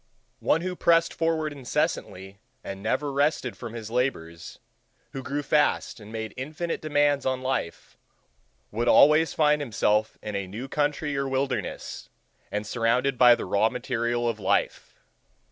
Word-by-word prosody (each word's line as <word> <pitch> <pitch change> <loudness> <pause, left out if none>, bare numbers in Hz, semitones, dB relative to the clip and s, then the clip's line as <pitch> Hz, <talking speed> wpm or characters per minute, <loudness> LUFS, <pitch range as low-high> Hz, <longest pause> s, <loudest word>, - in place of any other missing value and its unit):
One 165 - +2
who 180 +1 -3
pressed 165 -1 +3
forward 160 -2 -1
incessantly 100 -7 -3 0.2
and 95 0 -7
never 140 +7 -1
rested 140 -5 0
from 115 0 -8
his 110 -1 -7
labors, 85 -10 -3 0.5
who 135 - -6
grew 140 +3 -3
fast 150 -3 +1
and 105 0 -12
made 110 -1 -5
infinite 155 +6 -4
demands 145 -2 +2
on 130 -1 -1
life, 130 -10 -3 0.7
would 120 +3 -2
always 150 +5 +5
find 150 -1 +3
himself 110 -4 0
in 105 -1 -5
a 100 -1 -3
new 110 +8 -6
country 145 +1 -1
or 140 0 -1
wilderness, 135 +1 -3 0.4
and 105 +1 -2
surrounded 125 +4 0
by 125 -1 +8
the - - -5
raw 100 +4 +2
material 120 -1 -2
of 115 -2 -2
life. 95 - -1
130 Hz, 145 wpm, -26 LUFS, 110-145 Hz, 0.7 s, by